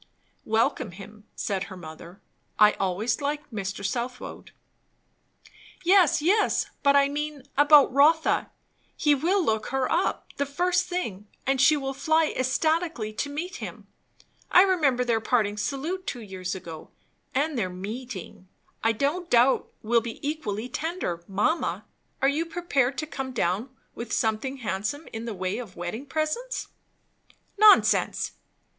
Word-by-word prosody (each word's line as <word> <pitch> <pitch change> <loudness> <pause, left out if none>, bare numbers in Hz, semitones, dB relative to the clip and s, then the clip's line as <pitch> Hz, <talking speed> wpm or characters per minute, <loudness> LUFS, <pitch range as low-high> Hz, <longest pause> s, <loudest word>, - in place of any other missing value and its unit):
"Welcome 220 -2 0
him," 210 +3 -12
said 195 -2 -2
her 185 - -10
mother. 170 +2 -11 0.4
"I 210 0 +7
always 205 +6 0
liked 290 -1 -3
Mr. 200 -1 -4
Southwode." 250 +4 -4 1.3
"Yes, 355 -5 +4
yes, 415 +6 +2
but 280 -1 +4
I 280 0 +5
mean, 295 -1 -4
about 290 -2 +6
Rotha. 310 +4 +4 0.5
He 295 -1 +4
will 345 +6 +1
look 220 -1 0
her 265 0 -1
up, - - 0
the 280 - 0
first 355 +5 +1
thing; 220 - -4 0.2
and 270 -1 +2
she 300 +4 +6
will 270 -1 -3
fly 315 +3 +2
ecstatically 310 -3 0
to 285 +7 -3
meet 345 +7 -5
him - - -8 0.6
I 360 - +7
remember 290 -10 +2
their 230 -2 +1
parting 215 -3 +1
salute 290 - -3
two 245 - -4
years 190 -2 -5
ago, 165 -4 -9 0.5
and 295 +3 +1
their 200 -7 -1
meeting. 195 0 -7 0.4
I 225 0 +3
don't 300 +9 -1
doubt, 245 +2 +3
will 230 +1 +3
be 230 0 -6
equally 240 -8 -3
tender. 305 - -3
Mamma, 210 - 0 0.4
are - - +6
you 305 +4 0
prepared 285 -6 0
to 310 - -2
come 270 -4 -5
down 210 +3 0 0.2
with 235 -1 -7
something 225 +5 0
handsome 220 +6 -3
in 225 +1 -5
the 230 -3 -4
way 185 +4 -2
of 220 -7 -9
wedding 195 +11 -5
presents?" 315 - -2 0.9
"Nonsense!" 425 -1 +5
260 Hz, 140 wpm, -26 LUFS, 215-305 Hz, 1.3 s, I